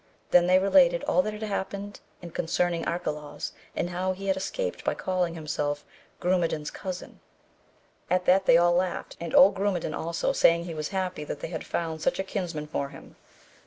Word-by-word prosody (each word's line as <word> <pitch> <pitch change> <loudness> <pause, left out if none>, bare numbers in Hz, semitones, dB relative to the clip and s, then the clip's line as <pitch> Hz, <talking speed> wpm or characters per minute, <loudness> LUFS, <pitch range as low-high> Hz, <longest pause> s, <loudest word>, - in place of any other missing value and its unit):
Then 175 0 +6
they 185 +1 +6
related - - +4
all - - +3
that 215 -5 -3
had 210 +1 -6
happened 200 0 -4 0.2
and 170 - -8
concerning 170 0 0
Arcalaus, 150 -4 -3 0.2
and 175 - -1
how 185 +1 -1
he 195 +1 -8
had 190 -1 +2
escaped 485 - -3
by - - 0
calling 180 -2 -1
himself 145 -2 -2 0.3
Grumedan's 170 -4 0
cousin; 185 -1 -7 0.9
at 180 0 +1
that 190 +1 +4
they 165 - +8
all 175 0 +4
laughed, 180 +1 -1
and 170 -1 -3
old 195 +2 +8
Grumedan 190 -5 -1
also, 170 +1 -1
saying 170 0 +4
he 170 -1 -6
was 155 -1 -3
happy 185 -5 -2
they 150 +1 -5
had 160 -3 -4
found 160 -2 -3
such - - +1
a 190 - -1
kins 185 -3 -4
man 150 0 -4
for 140 -2 -3
him. - - -13
180 Hz, 185 wpm, -27 LUFS, 165-190 Hz, 0.9 s, they